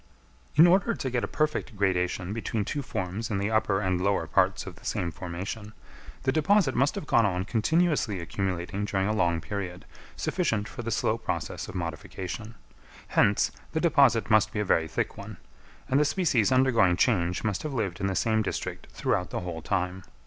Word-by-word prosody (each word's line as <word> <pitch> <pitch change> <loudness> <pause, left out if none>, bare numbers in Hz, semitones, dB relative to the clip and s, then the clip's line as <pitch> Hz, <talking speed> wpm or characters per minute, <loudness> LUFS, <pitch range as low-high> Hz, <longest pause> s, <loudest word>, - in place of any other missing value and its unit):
In 155 +3 +8
order 195 +6 +4
to 130 - -3
get 120 -1 0
a - - -1
perfect 150 -7 -1
gradation 90 -1 0
between 110 -2 -2
two 145 - -2
forms 105 -1 -4
in 105 - -1
the 100 +2 -1
upper 105 -3 +2
and 90 -2 0
lower 100 -3 +1
parts - - +1
of - - -9
the - - -18
same 85 -1 -2
formation, 95 +6 -6 0.5
the 130 - +2
deposit 160 0 +3
must 140 +3 +2
have - - -4
gone 115 - +4
on 95 -3 0
continuously 125 - +1
accumulating 90 +2 -3
during 95 -2 0
a 105 - +1
long 85 -5 +1
period, 90 -2 -5 0.3
sufficient 115 - -1
for - - -7
the 115 - -4
slow 115 0 0
process - - -4
of - - -9
modification; 90 - -5 0.5
hence, - - +3 0.2
the - - +1
deposit 140 - +4
must 110 -1 +4
be 105 - -3
a 105 - 0
very 80 -4 +2
thick - - -2
one; - - -8 0.5
and 135 - +3
the - - +5
species 150 - +2
undergoing 115 -9 +4
change 90 -6 +1
must 105 -4 -1
have 155 - -4
lived 100 -7 -2
in 95 - 0
the 95 - -1
same 110 +1 +2
district 105 - -4
throughout 90 - -1
the - - -3
whole 85 -2 -5
time. 90 +2 -1
105 Hz, 190 wpm, -27 LUFS, 90-130 Hz, 0.5 s, In